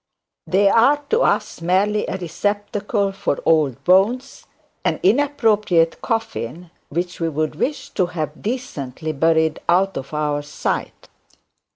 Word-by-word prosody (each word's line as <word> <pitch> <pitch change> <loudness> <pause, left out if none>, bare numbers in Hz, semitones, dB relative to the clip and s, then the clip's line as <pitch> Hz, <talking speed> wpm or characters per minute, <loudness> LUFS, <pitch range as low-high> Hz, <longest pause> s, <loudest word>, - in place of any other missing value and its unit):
They 200 +2 +3
are 240 +8 +5
to 455 - +4
us, - - 0
merely 195 +5 +1
a 190 - -3
receptacle 205 - -1
for 195 -7 -2
old 150 -6 +2
bones, 220 +9 +2 0.4
and - - 0
inappropriate 210 - +2
coffin, 175 - -3 0.2
which 175 +3 -3
we 165 -1 0
would 155 0 -1
wish 280 - -3
to 185 -3 +1
have 155 -3 -5
decently 160 - -4
buried 160 +1 +2
out 190 +2 +3
of 135 - -6
our 150 -1 -1
sight. 145 +1 -4
180 Hz, 130 wpm, -21 LUFS, 160-210 Hz, 0.4 s, are